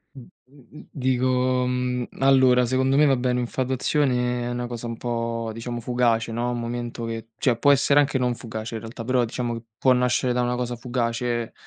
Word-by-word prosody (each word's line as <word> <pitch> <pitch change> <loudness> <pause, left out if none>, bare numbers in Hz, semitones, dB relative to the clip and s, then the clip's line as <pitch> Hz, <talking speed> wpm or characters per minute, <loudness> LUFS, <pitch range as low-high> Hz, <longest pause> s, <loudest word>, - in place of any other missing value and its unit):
Mh - - -9
mh 135 +3 -19
mh, - - -13
dico, 130 -1 +1
mhmm, 125 -1 -1
allora, 130 -2 +5
secondo 130 +2 +1
me 150 - +6
vabbé 130 -2 +2
un'infatuazione 125 0 0
è - - -2
una 120 0 -3
cosa 120 -1 -6
un 115 -1 -5
po' 115 -1 -3
diciamo 120 +1 -5
fugace, 115 -1 +1
no. 120 +2 -1
Un 120 - -3
momento 120 0 -4
che 115 0 -6
cioè, 125 -4 +2
può 145 +4 +4
essere 140 +1 +4
anche 145 -1 +2
non 125 -1 0
fugace 110 -1 -6
in 110 - -5
realtà, 115 +1 -8
però 125 0 +1
diciamo 120 0 -3
che 115 - -8 0.2
può 130 -1 +5
nascere 125 0 +1
da 125 - +1
una 125 0 0
cosa 125 0 -3
fugace. 120 -1 -2
125 Hz, 195 wpm, -24 LUFS, 120-130 Hz, 0.2 s, me